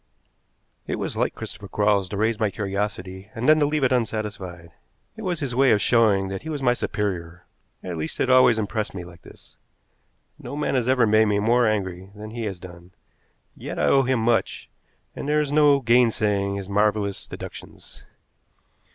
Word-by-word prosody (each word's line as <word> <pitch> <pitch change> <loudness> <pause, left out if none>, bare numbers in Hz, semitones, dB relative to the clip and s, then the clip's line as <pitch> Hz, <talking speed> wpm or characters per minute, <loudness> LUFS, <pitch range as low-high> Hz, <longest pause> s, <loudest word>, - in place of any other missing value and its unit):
It - - -1
was - - -4
like - - -1
Christopher 100 - -8
Quarles 100 -1 +1
to 100 - -5
raise 110 +1 0
my 110 - +1
curiosity, 100 -1 -4
and 115 +2 -2
then 155 0 +6
to 145 - +3
leave 150 -1 -1
it 130 - +3
unsatisfied. 100 -7 -3 0.4
It 220 - -9
was 180 -5 -2
his 135 -4 -2
way 135 +2 +4
of 105 - +4
showing 105 -4 +3
that 95 0 -5
he 160 - -8
was 145 -3 -4
my 120 -1 +4
superior 90 -7 -4 0.4
at 90 -2 -5
least, 80 0 -5
it - - +1
always 130 -3 +5
impressed 105 -1 -3
me 90 - -5
like 90 0 -14
this. - - -18 0.8
No - - -7
man 150 -1 -1
has 125 -2 +1
ever 130 -3 +4
made 110 +1 +4
me 105 -1 +1
more 115 +3 +3
angry 95 -3 -2
than 105 +1 -9
he 115 0 -4
has 95 -4 -5
done. 85 0 -13 0.6
Yet - - -7
I - - 0
owe 135 - +5
him 130 -2 0
much, 115 0 0 0.4
and 145 - -5
there 150 0 +3
is 150 -2 -1
no 145 -2 +4
gainsaying 110 -5 +2
his 100 -1 -5
marvelous 105 0 0
deductions. - - -11
110 Hz, 185 wpm, -24 LUFS, 100-125 Hz, 0.8 s, then